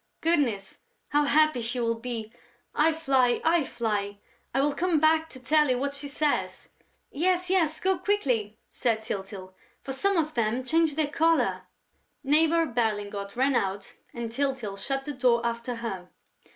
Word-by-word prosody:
Goodness, 265 - 0 0.3
how 295 0 +2
happy 310 -3 +3
she 240 +2 -3
will 230 -1 +1
be!... 230 -1 -6 0.4
I 315 +2 +3
fly, 270 -6 +2
I 330 0 +3
fly!... 210 -5 -2 0.3
I 270 - 0
will 285 +1 +2
come 345 -1 +1
back 320 +1 +3
to 260 - -11
tell 300 +3 +2
you 250 - +2
what 280 +2 -2
she 285 0 -4
says...." 290 +1 -2 0.4
"Yes, 360 +4 0
yes, 325 -5 +2
go 380 -1 +1
quickly," 250 - 0
said 225 -4 -1
Tyltyl, 195 -3 -6 0.3
"for 270 - -4
some 395 +8 +1
of 310 -2 0
them 235 +2 0
change 320 +2 +2
their 310 -1 +1
color!" 330 +1 +1 0.6
Neighbour 320 +4 +3
Berlingot 205 -5 -2
ran 265 +3 +2
out 195 -2 -2 0.2
and 235 -1 -5
Tyltyl 260 -5 -2
shut 270 +6 -3
the 295 - -4
door 245 -3 +2
after 235 +1 -2
her. 195 -6 -6
265 Hz, 160 wpm, -27 LUFS, 230-310 Hz, 0.6 s, happy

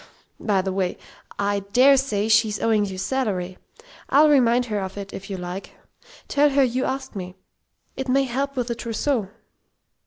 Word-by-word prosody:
By 195 -3 +1
the 190 - -2
by, 185 -1 -1 0.4
I 200 0 0
dare 270 +3 +7
say 220 -6 0
she's 215 -1 +3
owing 220 -2 +2
you 190 -2 -6
salary. 190 -5 -2 0.5
I'll 300 +3 +6
remind 245 -3 +4
her 210 -3 -2
of 190 0 -6
it 200 -1 -7
if 195 +1 -8
you 195 - -4
like 180 +2 -7 0.5
tell 290 +1 +3
her 275 0 +3
you 255 +1 0
asked 265 -2 -4
me. 185 -1 -6 0.6
It 265 -1 -4
may 275 +2 +3
help 275 +2 -2
with 250 -2 -2
the - - 0
trousseau." 230 -1 -2
225 Hz, 175 wpm, -23 LUFS, 195-265 Hz, 0.6 s, dare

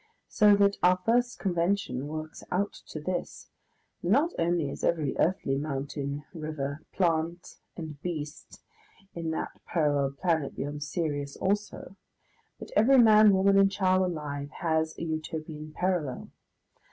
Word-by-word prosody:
So 210 -2 +5
that 200 0 +3
our 180 +1 +5
first 245 +1 +2
convention 175 -7 -1
works 155 +1 -6
out 200 +3 0
to 155 - -6
this, 175 +4 -5 0.5
that 175 - -3
not 290 - +4
only 165 -4 +1
is - - -8
every 155 -5 +1
earthly 140 -6 +1
mountain, 140 0 -4
river, 155 -3 -4
plant, 170 -1 -1 0.2
and 155 -4 -7
beast 155 -4 -6 0.5
in 165 -1 -4
that 160 - -3 0.2
parallel 145 -4 +1
planet 160 -6 0
beyond 145 +1 -4
Sirius 145 -3 -3
also, 200 -1 -2 0.6
but - - -10
every 270 +4 +6
man, 215 -3 +7
woman, 195 +1 +4
and 195 0 +5
child 185 -1 +2
alive 150 -5 -3
has 160 -2 0
a - - -5
Utopian 155 -1 -5
parallel. 175 -7 -2
165 Hz, 135 wpm, -28 LUFS, 150-190 Hz, 0.6 s, man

